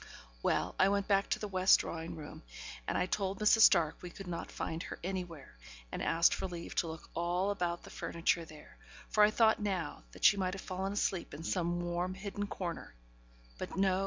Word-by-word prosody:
Well, - - +1
I 190 - +6
went 200 0 0
back 195 -1 +2
to - - +1
the 210 - -4
west 185 -1 +5
drawing 165 0 -5
room, 150 -2 -9 0.5
and - - 0
I - - +2
told 195 0 -1
Mrs. 210 +1 +5
Stark 170 -8 +6
we 180 - -7
could 195 +3 -10
not 175 -2 -5
find 160 +1 -4
her - - -6
anywhere, 175 - -5 0.4
and - - -4
asked 165 +1 +4
for 190 - -2
leave 175 -2 -7
to 170 - +2
look 160 0 -8
all 175 +4 0
about 175 -3 -2
the - - -11
furniture 170 0 0
there, 155 - -14 0.3
for 210 - +5
I 210 - +7
thought 220 0 +3
now 185 -7 -2
that - - -3
she 205 - +7
might 185 -1 -1
have 195 - -7
fallen 190 +1 -3
asleep 190 -6 -1
in 155 - -8
some 175 0 0
warm, 175 +1 -2
hidden 205 +1 -4
corner; 175 - -5 0.6
but - - -5
no! 190 -1 +3
185 Hz, 205 wpm, -33 LUFS, 170-195 Hz, 0.6 s, I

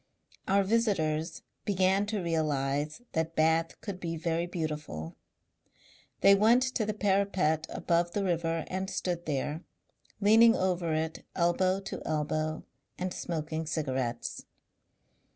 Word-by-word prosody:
Our 200 +1 +4
visitors 170 -7 0 0.2
began 190 +1 +2
to 210 -3 -2
realize 150 - -1
that 160 0 -1
Bath 160 +1 +2
could 200 -4 -5
be 165 -2 -3
very 165 +1 -1
beautiful. 150 - -4 1.1
They 200 - +8
went 225 +5 +5
to 255 -5 -1
the 215 - 0
parapet 190 -6 +1
above 170 0 0
the 205 - 0
river 165 -3 0
and 190 +1 -3
stood 175 -3 -3
there, 150 +3 -2 0.6
leaning 225 +3 +6
over 180 -3 0
it 160 +1 -2
elbow 185 +2 +2
to 195 - -6
elbow 155 +1 -1 0.3
and 185 0 -3
smoking 160 -1 -3
cigarettes. 130 -7 -2
170 Hz, 120 wpm, -30 LUFS, 155-195 Hz, 1.1 s, They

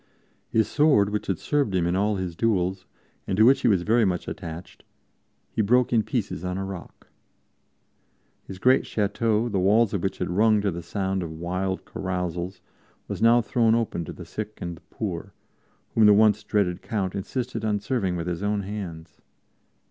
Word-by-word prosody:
His 110 -1 +2
sword, 140 -10 +3
which 105 - -3
had 95 - 0
served 140 - 0
him 90 -2 +2
in 85 +1 0
all 105 +2 +1
his 90 -3 -4
duels, 95 -3 0 0.4
and 95 - -1
to 110 - +6
which 135 +3 +5
he - - +2
was 95 -6 +3
very 115 +4 +3
much 90 -4 -1
attached, 85 -2 -8 0.7
he - - 0
broke 125 +4 +3
in 115 - +4
pieces 105 - -3
on 90 0 -2
a 95 - -3
rock. 95 -3 -9 1.4
His 95 - -7
great 130 +7 +3
chateau, 110 +2 0
the 100 -5 -1
walls 105 +4 +3
of 100 - -1
which 95 - -2
had 90 - -3
rung 110 +3 +4
to 100 -1 0
the 85 0 -5
sound 95 +2 -2
of 85 - -4
wild 90 +4 -3
carousals, 90 0 -4 0.5
was - - -5
now 115 +1 +6
thrown 115 -1 +2
open 115 -7 -1
to - - -7
the - - -10
sick 110 0 -6
and 85 -1 -5
the - - -17
poor, - - -5 0.6
whom 110 -2 +5
the 105 - +7
once 105 0 +4
dreaded 95 -5 0
Count 95 -4 -2
insisted 115 +3 -4
on 105 -1 +1
serving 100 -5 -1
with 85 -1 -3
his 90 0 -3
own 105 0 0
hands. 85 -6 -7
100 Hz, 185 wpm, -25 LUFS, 90-110 Hz, 1.4 s, the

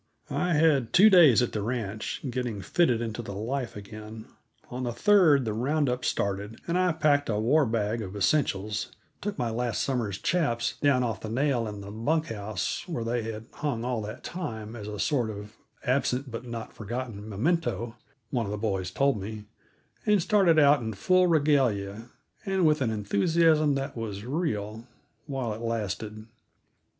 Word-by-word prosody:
I 160 +5 0
had 150 -6 +3
two 210 +4 +7
days 150 - +7
at 125 - -1
the 105 - -2
ranch, 110 -2 -3
getting 125 -4 -3
fitted 120 - +2
into 115 0 -3
the 100 -4 -7
life 120 +4 -3
again; 110 +2 -9 0.5
on 125 +1 -4
the 120 -1 -1
third 160 - +4
the 110 - -1
round 140 +6 +1
up 125 0 -2
started, 100 +2 -2
and 170 - 0
I 180 0 +3
packed 150 -4 +2
a 105 -2 0
"war 135 +6 +3
bag" 110 0 -1
of 100 -1 -7
essentials, 105 -2 0 0.3
took 205 0 -3
my 120 -2 -1
last 115 -4 -1
summer's 115 -8 -1
chaps 120 - 0
down 140 -3 +3
off 115 -2 -2
the 110 - -5
nail 125 -1 +1
in 105 -1 -6
the 100 0 -8
bunk 155 +9 0
house 105 -3 -3
where 160 -10 -3
they 120 +1 -1
had 110 0 -8
hung 130 -6 -2
all 125 -3 -1
that 105 +1 -7
time 110 -11 -5
as 105 -3 -7
a 105 0 -5
sort 125 -2 +1
of 105 0 -8 0.3
absent 130 0 0
but 115 +2 -6
not 115 -1 -6
forgotten 110 -1 -6
memento, 120 - -1 0.4
one 120 -5 0
of - - -4
the 105 - -2
boys 95 -4 -1
told 135 +1 +1
me, 105 +1 -7 0.6
and 210 -1 +5
started 190 -6 +4
out 145 -2 +6
in 110 -1 -3
full 185 - +3
regalia 120 - +1 0.3
and 190 -2 +1
with 155 -2 +3
an 125 - +2
enthusiasm 150 +9 +2
that 135 0 -3
was 110 -3 -5
real 115 - -3 0.4
while 130 -6 -2
it 110 - -8
lasted. 110 -1 -3
120 Hz, 175 wpm, -27 LUFS, 110-145 Hz, 0.6 s, two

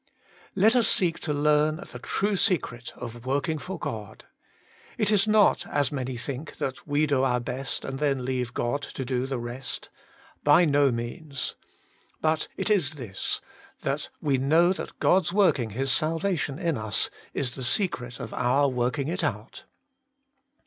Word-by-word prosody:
Let 215 +5 +5
us 240 -3 +4
seek 180 -8 +3
to 155 - -2
learn 150 +1 +3 0.2
the - - -8
true 205 +1 0
secret 140 - 0
of 120 -1 -7
working 140 +4 0
for 185 +4 -5
God. 110 -9 -6 0.7
It 210 0 +2
is 205 -1 +4
not, 215 -1 +4
as 145 -3 +1
many 130 -3 -3
think, 140 +5 -5
that 130 +3 -4
we 145 +1 +2
do 140 -3 +2
our 125 -2 +2
best, 130 +3 -4
and 135 0 -4
then 140 -4 0
leave 125 -1 -2
God 120 +4 0
to 135 -2 -5
do 130 0 -1
the 135 -1 -2
rest. 120 +2 -5 0.5
By 150 +4 +6
no 145 -2 +4
means. 125 +4 -3 0.7
But 155 -1 +1
it - - 0
is 160 -7 +2
this, 115 -9 -3 0.4
that - - -1
we 140 -3 +1
know 165 +7 +4
that - - -7
God's 180 -2 +3
working 180 - +3
His 130 +5 -1
sal 160 +3 +2
vation 160 -7 -1
in 165 -8 0
us 110 0 0 0.2
is 125 -3 -1
the 130 - -5
secret 125 - 0
of 125 -4 -6
our 135 +4 +3
working 125 +2 -1
it 175 +4 -2
out. - - -4
140 Hz, 165 wpm, -27 LUFS, 125-165 Hz, 0.7 s, By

